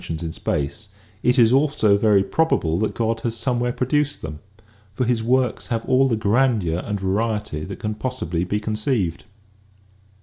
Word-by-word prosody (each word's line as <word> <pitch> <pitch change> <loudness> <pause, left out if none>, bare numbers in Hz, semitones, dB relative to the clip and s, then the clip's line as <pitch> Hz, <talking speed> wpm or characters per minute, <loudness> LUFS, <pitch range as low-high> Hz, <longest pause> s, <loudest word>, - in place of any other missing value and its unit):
sions 80 +1 -5
in 80 - -3
space, 70 -3 -3 0.3
it 125 - +2
is 120 -1 +5
also 135 -7 +3
very 100 -1 +4
probable 90 - +1
that 110 - -1
God 115 0 0
has 115 0 -3
somewhere 120 0 0
produced 145 +4 -1
them. 75 -1 -6 0.5
For 125 - -1
His 120 -1 +1
works 125 +1 +1
have 115 -2 -2
all 130 +1 +3
the 115 -4 0
grandeur 105 -6 +1
and 105 -1 -3
variety 105 -3 -1
that 100 - -7
can 105 0 -3
possibly 105 -8 -3
be 100 +3 -1
conceived." 105 - -1
110 Hz, 165 wpm, -22 LUFS, 95-125 Hz, 0.5 s, is